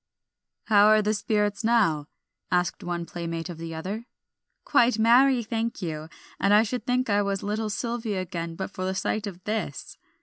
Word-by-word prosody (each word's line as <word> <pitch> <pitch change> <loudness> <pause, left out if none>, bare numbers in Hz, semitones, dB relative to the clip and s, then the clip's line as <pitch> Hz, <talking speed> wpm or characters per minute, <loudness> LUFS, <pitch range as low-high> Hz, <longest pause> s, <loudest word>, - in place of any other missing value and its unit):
"How 210 -1 +5
are 215 0 +5
the 210 +1 +1
spirits 210 0 0
now?" 200 -11 +2 0.4
asked 180 -1 0
one 175 -1 -3
playmate 165 0 -5
of 170 -2 -7
the 165 -1 -6
other. 200 +9 -5 0.6
"Quite 240 -1 +4
merry, 245 +3 +5
thank 225 +1 -2
you; 155 -2 -4 0.3
and 200 +1 +4
I 215 - +6
should 245 +3 -4
think 255 +1 +1
I 205 -1 +3
was 200 -1 -2
little 215 +1 -2
Sylvia 225 -2 -2
again 170 -2 -4
but 190 +3 -5
for 185 - -5
the 190 +1 -1
sight 215 +2 -1
of 185 -2 -9
this." 210 -9 -4
205 Hz, 175 wpm, -26 LUFS, 175-225 Hz, 0.6 s, I